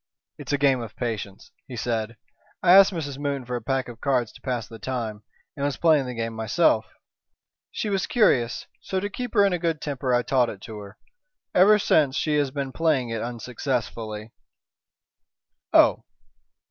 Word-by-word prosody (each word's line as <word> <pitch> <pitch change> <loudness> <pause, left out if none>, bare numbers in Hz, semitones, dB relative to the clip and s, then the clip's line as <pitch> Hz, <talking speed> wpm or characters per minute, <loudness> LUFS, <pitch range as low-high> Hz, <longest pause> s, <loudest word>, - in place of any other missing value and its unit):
"It's - - -6
a 145 - +2
game 135 -3 +3
of 110 -2 -8
patience," 105 -5 -5 0.2
he 125 - -8
said. 115 -1 -2 0.5
"I 180 0 +7
asked 195 +1 +8
Mrs. 145 -6 -5
Moon 140 -3 -2
for 125 +1 -4
a 120 - -3
pack 135 +3 -1
of 120 -1 -11
cards 125 -5 +1
to - - -17
pass 125 -4 -3
the 115 - -11
time, 115 -5 -4 0.3
and 140 - -4
was 145 -1 -1
playing 155 -5 +3
the 125 - -5
game 115 0 -3
myself. 110 -1 +2 0.8
She - - -4
was 195 -2 0
curious; 125 - +2 0.2
so, 190 - -2
to 205 +2 -4
keep 245 +2 -5
her 200 - +6
in 195 - +2
a 175 - -1
good 165 -2 -1
temper, 135 -3 -3
I 120 0 +3
taught 125 -2 +2
it 100 - -8
to 110 -1 -8
her. 100 -1 -11 0.6
Ever 205 +4 +6
since 150 -8 +2
she 155 -1 +1
has 145 -2 +1
been 135 0 -4
playing 145 -6 +1
it 115 -1 -2
unsuccessfully." 115 -3 -4 1.4
"Oh!" - - +5
130 Hz, 185 wpm, -25 LUFS, 115-150 Hz, 1.4 s, asked